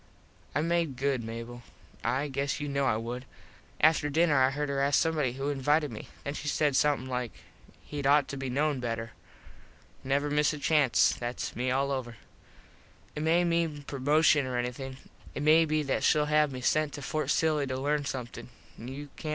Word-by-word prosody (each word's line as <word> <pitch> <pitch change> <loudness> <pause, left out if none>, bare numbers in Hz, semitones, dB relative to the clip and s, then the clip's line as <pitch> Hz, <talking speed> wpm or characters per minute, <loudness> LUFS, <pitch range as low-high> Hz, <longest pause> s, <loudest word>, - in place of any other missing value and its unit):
I 145 - +2
made 165 -3 0
good, 135 -2 0
Mable. 115 +2 -7 0.4
I 130 +5 0
guess 140 +1 -2
you 145 - -3
kno 140 -1 0
I 110 -5 +2
would. 120 +3 -5 0.6
After 155 -1 +4
dinner 160 +1 +3
I 130 - +5
heard 145 +2 -2
her 140 -1 -1
ask 140 0 +3
somebody 155 -6 0
who 135 +2 -3
invited 145 +1 +1
me. 110 - -8 0.2
Then 140 - -3
she 150 - -6
said 150 -1 +1
somethin 145 -1 +2
like 125 -3 -3 0.6
"Hed 145 -2 -3
ought 145 0 +4
to - - -4
be 135 -1 -4
known 145 +2 0
better." 115 -2 -3 0.9
Never 140 +2 0
miss 150 0 +2
a - - -5
chance. 145 -4 +3
Thats 120 0 -5
me 125 +1 -1
all 135 +2 +1
over. 125 -3 -3 1.0
It 150 - -3
may 165 +3 +3
mean 165 -4 0
promoshun 145 +1 +3
or 125 -1 -2
anything. 125 +2 -4 0.4
It 145 - -3
may 160 +2 +6
be 155 -1 0
that 135 - -1
shell 150 -1 +4
have 150 -1 +2
me 130 -1 -6
sent 155 +4 +1
to 145 - -7
Fort 155 +2 -2
Silly 155 -3 +2
to 130 0 -3
learn 145 +2 0
somethin. 130 -4 -6 0.3
You 135 +5 -7
cant - - -30
tell. 155 - -5
140 Hz, 190 wpm, -29 LUFS, 130-150 Hz, 1.0 s, may